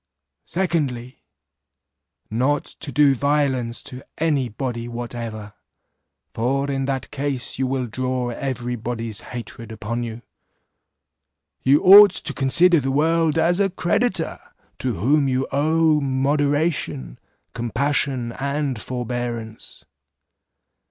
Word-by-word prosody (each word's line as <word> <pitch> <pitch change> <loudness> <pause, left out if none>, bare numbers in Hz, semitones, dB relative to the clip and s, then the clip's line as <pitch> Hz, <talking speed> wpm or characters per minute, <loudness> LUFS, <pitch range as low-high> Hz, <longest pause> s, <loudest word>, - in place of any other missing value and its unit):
"Secondly, 145 -9 -2 1.1
Not 130 +6 +1
to 150 - -8
do 140 +1 +5
violence 135 -3 0
to 130 0 -8 0.2
any 145 -6 +1
body 120 0 -4
whatever, 115 -3 -6 0.8
for 135 +4 0
in 135 -1 -1
that 135 -1 -3
case 140 -3 -2
you 130 - +1
will 130 -1 -1
draw 125 +1 -2
every 125 -1 -3
body's 115 -2 -4
hatred 115 -2 -8
upon 115 +2 -4
you. 115 0 -6 1.4
You 140 +3 +4
ought 200 +2 +10
to 155 - -5
consider 165 +6 +4
the 135 -1 -2
world 160 +3 +2
as 170 +3 +2
a 200 -1 +3
creditor, 185 0 0 0.4
to 125 -4 -1
whom 140 - +2
you 130 0 0
owe 155 +2 +2
moderation, 140 - 0 0.3
compassion, 125 +1 -1
and 140 -3 -2
forbearance. 120 - -5
130 Hz, 110 wpm, -22 LUFS, 120-145 Hz, 1.4 s, ought